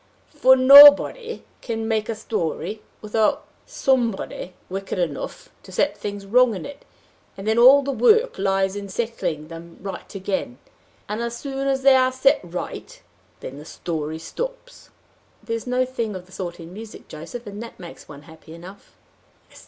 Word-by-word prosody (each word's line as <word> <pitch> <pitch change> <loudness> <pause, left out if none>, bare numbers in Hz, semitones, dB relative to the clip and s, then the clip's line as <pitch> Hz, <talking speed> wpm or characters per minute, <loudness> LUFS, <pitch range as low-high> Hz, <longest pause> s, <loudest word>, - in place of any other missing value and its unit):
For 260 -3 +6
nobody 285 - +7 0.2
can 225 -2 -4
make 220 -1 -1
a 225 - -2
story 210 -1 -4 0.2
without 215 0 0 0.2
somebody 230 -8 -1
wicked 195 +1 -5
enough 185 - -4
to - - -15
set - - 0
things 200 -1 -6
wrong 240 +2 +3
in 180 - -7
it, 285 0 -11 0.5
and 195 +2 -8
then 220 +1 +2
all 270 +4 +7
the 275 - -2
work 450 - +3
lies 195 0 0
in 200 -1 -6
setting 190 -9 -3
them 165 +1 -11
right 195 +2 -8
again, 190 -10 -3 0.5
and, 210 +2 -4
as 235 0 -4
soon 275 +1 -4
as 270 -1 0
they 270 -1 +7
are 255 0 +3
set 260 +1 +3
right, 175 0 -7 0.4
then 135 +2 -8
the - - -10
story 160 -2 -5
stops." - - -8 0.5
"There's 230 +1 -4
no 250 +1 +1
thing 230 -5 -4
of 180 -1 -8
the 185 - -22
sort 175 -2 -6
in 165 +1 -11
music, 220 +2 -11
Joseph, 170 +11 -9
and 205 +1 -8
that 230 - -10
makes 175 -2 -12
one 145 -1 -12
happy 160 0 -14
enough." 185 +4 -14
215 Hz, 165 wpm, -22 LUFS, 180-255 Hz, 0.5 s, nobody